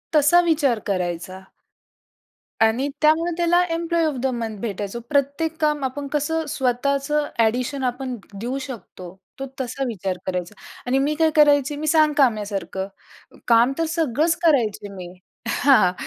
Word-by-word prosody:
तसा 300 +4 +6
विचार 295 -9 +1
करायचा. 185 -1 -3 1.2
आणि 225 +5 +2
त्यामुळे 315 +3 +3
त्याला 345 +1 +3
एम्प्लॉयी 335 0 0
ऑफ 300 - -1
द 265 - +1
मंथ 225 -3 -4
भेटायचो. 205 +1 -4
प्रत्येक 285 +3 0
काम, 300 -2 +1
आपण 280 +2 -3
कसं 305 +3 -1
स्वतःचं 280 +3 0 0.2
एडिशन 255 +4 -1
आपण 250 0 -3 0.2
देऊ 250 +4 -3
शकतो, 200 -7 -9 0.3
तो 270 - -4
तसा 265 +2 -3
विचार 195 -5 -3
करायचा 180 +2 -3 0.3
आणि 260 +2 +2
मी 290 +3 +1
काय 320 -1 +4
करायची, 290 -1 +4
मी 310 - -4
सांगकाम्यासारखं. 220 - +1 0.6
काम 235 +3 +5
तर 330 - +1
सगळंच 320 +2 +1
करायचे 230 -10 +2
मी. 180 -2 -8 0.4
हां, 275 +3 +4
हां. 180 -3 +3
270 Hz, 140 wpm, -22 LUFS, 220-300 Hz, 1.2 s, तसा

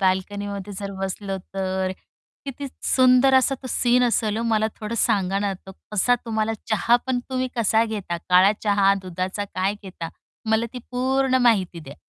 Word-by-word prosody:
बाल्कनीमध्ये 200 +1 -1
जर 200 -1 -4
बसलं 195 0 -3 0.2
तर, 190 -1 -1 0.5
किती 280 +1 -6
स - - -22 0.2
सुंदर 255 +1 +5
असा 260 +1 +4
तो - - -6
सीन 245 0 +3
असेल 220 -3 +1
ओ, 230 - -1
मला 215 0 +2
थोडं 215 +1 -4
सांगा 195 -1 +1
ना, 200 0 0
आता 190 0 -9 0.2
कसा 210 +5 +3
तुम्हाला 220 -1 -1 0.2
चहा 225 +2 +4
पण 260 -1 0
तुम्ही 255 0 -1
कसा 225 0 +3
घेता? 205 -6 -4
काळा 185 +3 +6
चहा, 200 -2 +4
दुधाचा 185 +2 -3
काय 195 0 -2
घेता? 185 -4 -7 0.4
मला 220 +1 +2
ती 250 - -6
पूर्ण 260 +1 +1
माहिती 190 -7 +2
द्या. 140 -2 -10
205 Hz, 170 wpm, -23 LUFS, 190-245 Hz, 0.5 s, काळा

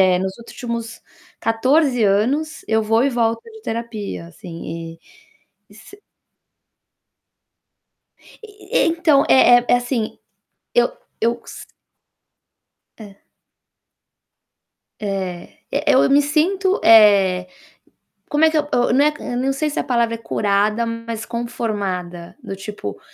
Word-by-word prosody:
eh, - - 0
nos 190 0 -3
últimos 235 -1 -6 0.4
14 255 +2 +2
anos, 255 +11 0
eu 220 0 +2
vou 225 +2 +2
e 280 - +2
volto 230 -2 0
de 445 -1 -14
terapia, 225 - -5
assim, 165 -2 -8
e - - -38 0.7
e 205 - -18
sa 310 - -15 2.5
E - - -9 0.3
e - - +4
então, 325 -4 +3
é - - +6 0.3
é - - +7
assim, 245 -2 -2 0.6
eu 485 - +4 0.3
eu 235 +1 0
se - - -10 1.3
É. 200 -3 -13 1.8
É, 190 -4 -5
e - - -1
eu 260 - +4
me 280 +1 +5
sinto, 370 +7 +1
eh, 200 -5 +6 0.8
como 295 +2 +3
é 320 - +5
que 315 - -2
eu 295 -1 0
eu 245 - +2
né, 290 +3 +4
eu 245 - -5
não 265 +2 0
sei 300 +3 -1
se - - -2
a - - -4
palavra 235 -3 0
é - - -6
curada, 210 +1 0
mas 230 -1 -5
conformada, 200 -7 -4
do 205 -5 -6
tipo: 195 - -7
230 Hz, 125 wpm, -20 LUFS, 200-270 Hz, 2.5 s, é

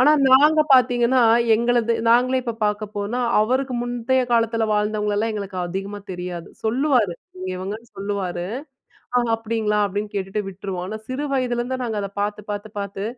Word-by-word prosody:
ஆனா 285 +4 +6 0.2
நாங்க 300 +4 +6
பார்த்தீங்கன்னா, 245 0 +4 0.3
எங்களது 235 0 +2 0.2
நாங்களே 255 +2 +4
இப்ப 235 -2 -3
பார்க்க 210 0 -3
போனா, 215 +5 -2 0.2
அவருக்கு 255 +2 0
முந்தைய 245 +1 0
காலத்ல 230 -1 +2
வாழ்ந்தவங்களல்லாம் 210 +1 0
எங்களுக்கு 195 -3 -4
அதிகமா 195 +3 -5
தெரியாது. 180 -1 -6 0.2
சொல்லுவாரு. 245 - +2 0.4
இவங்கன்னு 205 +5 -6
சொல்லுவாரு. 195 -3 -3 0.9
அப்டிங்களா? 220 -2 -1
அப்டின்னு 205 +1 -4
கேட்டுட்டு 195 +2 -2
விட்ருவோம். 185 -1 -5
ஆனா 215 - -4
சிறு 270 +3 -3
வயதிலேருந்து 250 0 -1
நாங்க 225 -3 -3
அத 200 - -3
பார்த்து 210 0 -3
பார்த்து 205 +1 -5
பார்த்து, 200 0 -5
220 Hz, 135 wpm, -22 LUFS, 200-245 Hz, 0.9 s, ஆனா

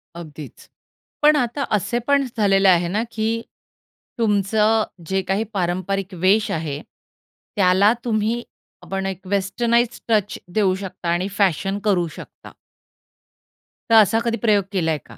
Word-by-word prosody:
अगदीच. 155 -4 -10 0.5
पण 300 0 +6
आता 280 +1 -1
असेपण 245 +7 0
झालेले 195 -2 +3
आहे 175 -1 +3
ना, 210 +5 -1
की 225 +1 -1 0.8
तुमचं 215 +1 +2
अ, - - +1 0.2
जे 190 +2 0
काही 195 +4 -1
पारंपरिक 185 +1 -2
वेश 210 +3 +3
आहे, 155 -2 -3 0.7
त्याला 195 +2 +4
तुम्ही 225 +1 0 0.4
आपण 195 0 -4
एक 190 -1 -5
वेस्टर्नाइज्ड 230 +5 0
टच 210 -2 +1 0.2
देऊ 195 -3 +2
शकता 185 -2 -6
आणि 175 +2 0
फॅशन 195 +1 +1
करू 185 -5 +2
शकता - - -12 1.4
तर 230 - +5
असा 220 +2 +2
कधी 235 0 0
प्रयोग 205 -3 +4
केलाय 165 -5 0
का? - - -15
200 Hz, 130 wpm, -21 LUFS, 185-220 Hz, 1.4 s, पण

